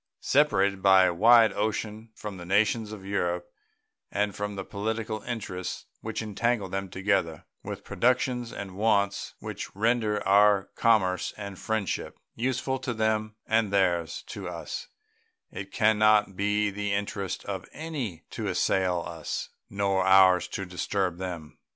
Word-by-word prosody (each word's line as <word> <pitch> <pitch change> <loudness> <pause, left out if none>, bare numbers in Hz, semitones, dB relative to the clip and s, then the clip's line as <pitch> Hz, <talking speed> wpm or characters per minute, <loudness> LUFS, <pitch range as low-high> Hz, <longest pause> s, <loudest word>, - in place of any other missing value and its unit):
Separated 100 -9 +3
by 95 -1 +7
a 90 - +3
wide 115 +3 +6
ocean 110 +1 -3
from 105 -3 -7
the 90 - -8
nations 105 +3 +2
of 100 -3 -9
Europe 90 -3 -1 0.6
and 105 -1 0
from 105 0 -4
the 95 - -5
political 110 +1 -3
interests 100 -6 -5
which 110 0 -4
entangle 110 0 0
them 95 +1 -4
together, 95 -4 -1 0.2
with - - -7
productions 125 -1 0
and 95 -2 -7
wants 100 -1 +1
which - - -7
render 110 -1 +1
our 100 0 +4
commerce 95 -5 +2
and 100 -2 -7
friendship 110 -4 -2 0.2
useful 130 +2 -1
to 120 -2 -3
them 110 0 0
and 110 -2 +1
theirs 90 -5 +1
to - - -6
us, - - -6 0.6
it 95 0 -7
can 110 -1 +3
not 105 -2 +4
be 105 +1 +1
the 105 +1 -3
interest 100 -1 -3
of - - -5
any 135 - -5
to - - -4
assail 90 -2 +1
us, 80 0 -5 0.2
nor 100 -1 +1
ours 95 -1 +6
to 95 - -5
disturb 90 0 -2
them. 85 -5 -6
100 Hz, 145 wpm, -27 LUFS, 95-110 Hz, 0.6 s, by